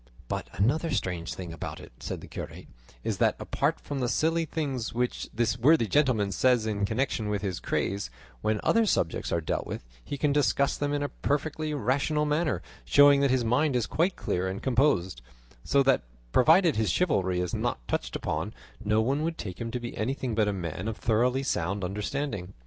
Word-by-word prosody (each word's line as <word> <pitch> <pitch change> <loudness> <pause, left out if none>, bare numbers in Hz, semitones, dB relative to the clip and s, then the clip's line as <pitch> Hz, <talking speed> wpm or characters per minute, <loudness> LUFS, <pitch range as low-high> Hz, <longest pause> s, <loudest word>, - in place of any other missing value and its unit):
"But - - -3
another 145 - +1
strange 90 - -2
thing 90 -3 -6
about 80 - -6
it," - - -12
said - - -5
the - - -10
curate, - - -7 0.4
"is - - -2
that, - - +3
apart - - 0
from 145 -1 -5
the 125 -2 0
silly 165 +4 +1
things 135 -7 -3
which 125 0 -1
this 120 +1 0
worthy 140 +1 +5
gentleman 115 -5 +2
says 125 +2 +3
in 105 -2 0
connection 110 -2 -1
with 105 -1 -1
his 95 -3 -2
craze, 100 -8 -1 0.3
when 110 0 +1
other 230 -1 +3
subjects 80 - 0
are 85 - +1
dealt 80 - -2
with, - - -6 0.2
he 145 - -5
can 145 0 +1
discuss 140 0 +2
them 145 0 -1
in 145 0 0
a 145 - -1
perfectly 155 +2 -2
rational 145 +4 +1
manner, 150 +1 0 0.2
showing 145 0 +6
that 140 - +3
his 125 -2 +2
mind 130 +5 +2
is 120 -3 +2
quite 175 +4 +1
clear 90 +1 -1
and 95 +1 -4
composed; 120 - +2 0.4
so 140 0 +3
that, 135 -1 +3 0.3
provided 160 - +5
his 110 -1 +1
chivalry 95 - +1
is 90 -1 -2
not - - -2
touched - - -2
upon, - - -3 0.3
no 105 +1 +2
one 135 +6 +1
would 165 +1 -2
take 95 - -6
him 115 - -3
to 125 - -3
be 120 0 -6
anything 125 +1 -2
but 110 -1 +2
a - - +2
man 90 +1 -4
of 115 - -3
thoroughly 125 +4 +2
sound 100 -5 -1
understanding." 100 0 -3
125 Hz, 195 wpm, -28 LUFS, 100-145 Hz, 0.4 s, showing